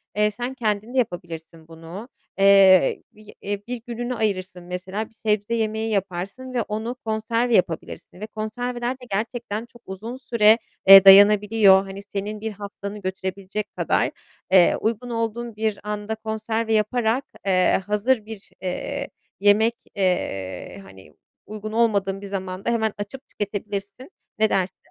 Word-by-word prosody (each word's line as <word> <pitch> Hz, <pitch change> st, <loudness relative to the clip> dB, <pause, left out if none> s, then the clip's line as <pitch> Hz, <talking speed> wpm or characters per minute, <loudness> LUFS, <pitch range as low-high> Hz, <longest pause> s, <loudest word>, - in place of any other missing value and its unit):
eee, 210 Hz, 0 st, +2 dB
sen 245 Hz, +4 st, -5 dB
kendin 220 Hz, -1 st, -2 dB
de -, -, -3 dB
yapabilirsin 165 Hz, -6 st, -4 dB
bunu. 165 Hz, +8 st, -10 dB, 0.3 s
Eee, 195 Hz, -2 st, +6 dB
bi 215 Hz, 0 st, -16 dB
eee, 205 Hz, 0 st, -3 dB
1 245 Hz, -2 st, -5 dB
gününü 240 Hz, +1 st, -3 dB
ayırırsın 190 Hz, -4 st, -2 dB
mesela 185 Hz, +4 st, -5 dB
bir -, -, -29 dB
sebze 210 Hz, 0 st, -1 dB
yemeği 220 Hz, 0 st, -1 dB
yaparsın 200 Hz, +6 st, -3 dB
ve 245 Hz, -, +1 dB
onu 220 Hz, +4 st, -4 dB
konserve 230 Hz, 0 st, 0 dB
yapabilirsin 175 Hz, +1 st, -2 dB
ve 215 Hz, -, -6 dB
konserveler 240 Hz, +3 st, -3 dB
de 255 Hz, -1 st, -14 dB
gerçekten 225 Hz, +1 st, -3 dB
çok 240 Hz, 0 st, -19 dB
uzun 220 Hz, +6 st, -7 dB
süre, 230 Hz, -4 st, +4 dB, 0.3 s
eee, 195 Hz, 0 st, +11 dB
dayanabiliyor, 200 Hz, 0 st, +7 dB
hani, 195 Hz, +1 st, -8 dB
senin 205 Hz, +1 st, -5 dB
1 220 Hz, 0 st, -3 dB
haftanı 200 Hz, 0 st, -8 dB
götürebilecek 190 Hz, +2 st, -5 dB
kadar. -, -, +1 dB, 0.4 s
Eee, 185 Hz, -2 st, +6 dB
uygun 230 Hz, +2 st, -2 dB
olduğun 230 Hz, 0 st, -3 dB
bir 215 Hz, -2 st, -1 dB
anda 210 Hz, +1 st, -4 dB
konserve 220 Hz, +1 st, -2 dB
yaparak, 225 Hz, +4 st, +1 dB, 0.2 s
eee, 185 Hz, 0 st, +3 dB
hazır 210 Hz, +2 st, +1 dB
bir, 220 Hz, -2 st, -10 dB
eee, 180 Hz, -1 st, -4 dB, 0.3 s
yemek, 215 Hz, +3 st, +4 dB, 0.2 s
eee, 100 Hz, -, -2 dB
hani, 95 Hz, -5 st, -16 dB, 0.3 s
uygun 215 Hz, 0 st, -7 dB
olmadığın 200 Hz, -4 st, +1 dB
bir 200 Hz, -, -7 dB
zamanda 190 Hz, +1 st, -4 dB
hemen 220 Hz, -2 st, 0 dB
açıp 205 Hz, +7 st, -7 dB
tüketebilirsin, 205 Hz, -, -5 dB, 0.3 s
ne 220 Hz, 0 st, +4 dB
dersin? 185 Hz, -1 st, -1 dB
210 Hz, 140 wpm, -23 LUFS, 195-225 Hz, 0.4 s, eee